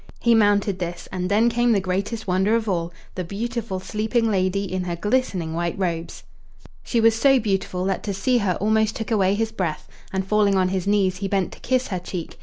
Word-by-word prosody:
He 235 - +3
mounted 205 -3 +3
this, 175 -1 -5
and 180 -1 -2
then 215 +3 +4
came 240 0 +2
the 205 - +3
greatest 195 +4 -2
wonder 190 +3 +2
of 225 -1 -1
all 170 -3 -1 0.2
the 185 - -3
beautiful 215 +1 -4
sleeping 220 +3 0
lady, 190 0 +1
in 185 -2 -3
her 175 -1 -2
glistening 195 -5 -1
white 170 0 -2
robes. 170 -3 -3 0.6
She 235 - 0
was 225 0 +5
so 270 +4 +4
beautiful 195 -4 -1
that 195 -1 -1
to 200 - -2
see 245 +6 +2
her 190 -4 0
almost 220 +1 +1
took 225 0 -5
away 195 -3 +3
his 225 +1 -1
breath; 180 -8 -3 0.2
and, 190 -1 -1
falling 205 0 +3
on 185 -1 +2
his 190 0 -2
knees, 195 -2 +2
he 195 +1 -3
bent 195 -2 0
to - - -12
kiss 255 0 0
her 185 -3 -2
cheek. 175 -1 -7
200 Hz, 210 wpm, -23 LUFS, 185-220 Hz, 0.6 s, was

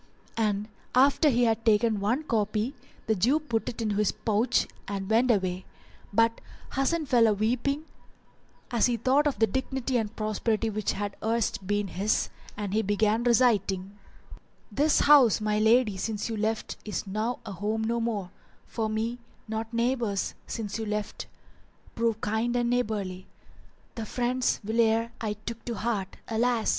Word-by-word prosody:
And 210 -2 0 0.3
after 280 +4 +5
he 245 -2 +2
had 225 -1 +1
taken 220 -1 +3
one 240 +9 0
copy 220 -1 0 0.3
the 220 - +2
Jew 240 - +2
put 235 -8 -2
it 230 -1 -5
into 210 -2 -1
his 210 -2 +2
pouch 215 +2 +1 0.2
and 195 -1 -4
went 230 +4 +3
away; 185 -4 +1 0.5
but 230 +2 +2 0.3
Hasan 305 +4 +1
fell 240 -4 +4
a 215 - +3
weeping 250 +8 0 0.9
as 235 -1 +3
he 240 -1 0
thought 265 +6 +3
of 285 - -1
the 225 - +4
dignity 260 +1 -1
and 220 -1 -2
prosperity 215 +1 -1
which 215 -1 -1
had 205 0 -4
erst 220 -4 -1
been 205 0 0
his 195 +6 0 0.3
and 205 -2 -3
he 220 - +3
began 215 +2 +1
reciting:— 205 -5 +2 0.7
"This 295 +2 +3
house, 280 -7 +6
my 210 0 0
lady, 220 -2 +4
since 210 +2 -3
you 225 - -2
left 220 +1 -2
is 210 - -4
now 215 +5 -2
a 215 - -6
home 210 +4 -2
no 235 +1 0
more 210 -6 -2 0.2
* - - -34
For 220 -2 -2
me, 225 +3 -2 0.3
nor 220 +1 -3
neighbours, 235 -4 0
since 215 -2 -4
you 220 - -3
left, 210 0 -3 0.7
prove 230 -1 0
kind 225 +3 0
and 240 0 +1
neighbourly: 205 -6 -2 0.7
The 225 -2 -5
friend, 250 +2 -1 0.2
whilere 225 +1 +2
I 215 -2 -1
took 220 +2 -8
to 235 - -3
heart, 210 -5 -2
alas! 230 0 +1
220 Hz, 160 wpm, -28 LUFS, 210-240 Hz, 0.9 s, house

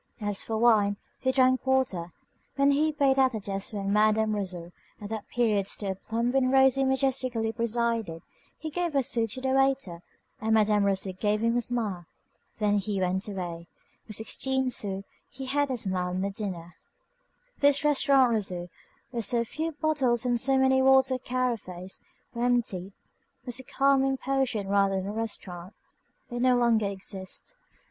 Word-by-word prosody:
As 205 -2 -2
for 225 - -3
wine, 215 -3 +3 0.2
he 260 - +1
drank 255 -1 +3
water. 255 -11 0 0.4
When 275 +1 +4
he 305 +2 +2
paid 275 -3 +2
at 260 -1 +4
the 220 - -3
desk 195 +3 -3
where 205 -2 -4
Madam 215 +2 +2
Rousseau, 180 -4 -4 0.3
at 205 - -8
that 220 -2 -5
period 215 -5 +1
still 200 -2 -2
plump 230 +5 -2
and 260 -1 +2
rosy 265 0 +5
majestically 260 -4 0
presided, 230 -6 -1 0.3
he 315 0 -6
gave 345 -2 -2
a 275 - +3
sou 230 -2 +1
to 255 +4 -5
the 265 - -1
waiter, 270 -10 +1 0.4
and 220 0 +2
Madam 210 -1 +3
Rousseau 195 -1 0
gave 210 +3 0
him 230 +1 +2
a 245 - +2
smile. 215 -8 -3 0.5
Then 205 -1 +2
he 200 0 -2
went 190 +2 -1
away. 175 -4 -5 0.4
For 215 - -8
sixteen 260 +4 -1
sous 195 -4 -2 0.3
he 265 +1 -8
had 285 +2 0
a 260 - -1
smile 185 -4 -1
and 185 +1 -1
a 200 - -2
dinner. 180 -4 -6 0.9
This 285 0 +3
Restaurant 275 -3 +4
Rousseau, 180 -5 -2 0.4
where 240 -2 -2
so 235 +2 +2
few 315 +8 -4
bottles 285 -6 +1
and 245 -1 +2
so 270 +2 +3
many 265 0 +4
water 265 -1 +4
carafes 230 -8 -3 0.3
were 235 - -5
emptied, 210 -6 0 0.5
was 245 0 -1
a - - -8
calming 270 0 +2
potion 260 -7 -1
rather 195 0 +2
than 190 0 -2
a 200 - -3
restaurant. 195 -4 -5 0.6
It 240 0 -3
no 255 0 +4
longer 235 -3 +2
exists. 195 - -5
230 Hz, 170 wpm, -27 LUFS, 200-265 Hz, 0.9 s, rosy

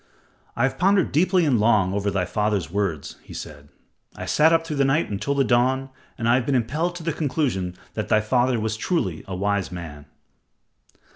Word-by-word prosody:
"I 120 - 0
have 135 - 0
pondered 190 -1 +3
deeply 180 +4 +3
and 130 -7 +2
long 105 -4 +3
over 100 0 0
thy 95 -2 0
father's 105 -2 -1
words," 95 -7 -2
he - - -12
said. 75 -1 -9 0.5
"I - - -6
sat 155 +2 +4
up 165 0 +2
through 155 -3 -4
the 140 - +3
night 135 +2 +1
until 110 +8 -2
the 140 - +3
dawn, 130 +2 +1 0.3
and 115 - -2
I 120 - +5
have 125 -1 +2
been 140 - +2
impelled 150 +9 -1
to 175 - -7
the 165 -1 -1
conclusion 130 - -1 0.2
that - - -3
thy 110 - +4
father 120 +2 +1
was 110 0 -2
truly 100 - -1
a 95 - -4
wise 100 0 -1
man." 80 -5 -8
120 Hz, 200 wpm, -23 LUFS, 100-145 Hz, 0.5 s, I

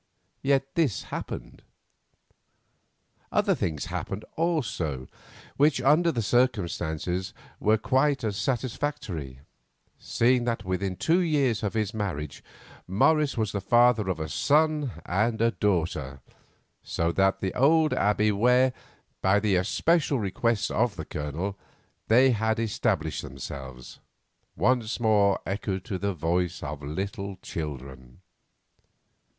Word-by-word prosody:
Yet 135 -1 +2
this 145 - +1
happened. - - -7 1.7
Other - - +2
things 75 -4 -2
happened 100 +2 -5
also 115 - -1 0.5
which, 145 -1 +4
under 155 +6 +4
the 115 -6 -2
circumstances, 95 -6 0 0.2
were 110 +1 +3
quite 135 +4 +1
as 105 -3 -1
satisfactory, 115 - -3 0.6
seeing 120 +1 +2
that 115 -4 -2
within 95 0 -2
two 160 - +2
years 140 - +1
of 105 0 -2
his 105 -2 -1
marriage 85 -10 -4 0.4
Morris 145 - +2
was 110 -2 0
the 100 - -3
father 120 -1 +4
of 90 -3 -2
a 80 - -3
son 150 - +2 0.2
and 110 +5 +1 0.2
daughter, 80 -9 -1 0.6
so 85 0 -1
that 95 +2 +2
the 95 - -2
old 155 +4 +4
Abbey, 105 +1 +2
where, 125 +5 +3 0.5
by 95 +2 +4
the 100 -2 +1
especial 150 - +2
request 105 0 0
of 115 -1 +1
the 80 - -6
Colonel, 80 +8 -4 0.5
they 130 +4 +5
had 110 0 0
established 105 -7 -1
themselves, 65 -2 -8 0.6
once 120 +2 +1
more 105 -4 +3
echoed 95 -1 -3
to 95 -6 -4
the 100 0 -1
voices 85 +2 -1
of 75 0 -5
little 95 +6 -4
children. 65 -3 -7
105 Hz, 120 wpm, -27 LUFS, 90-125 Hz, 1.7 s, they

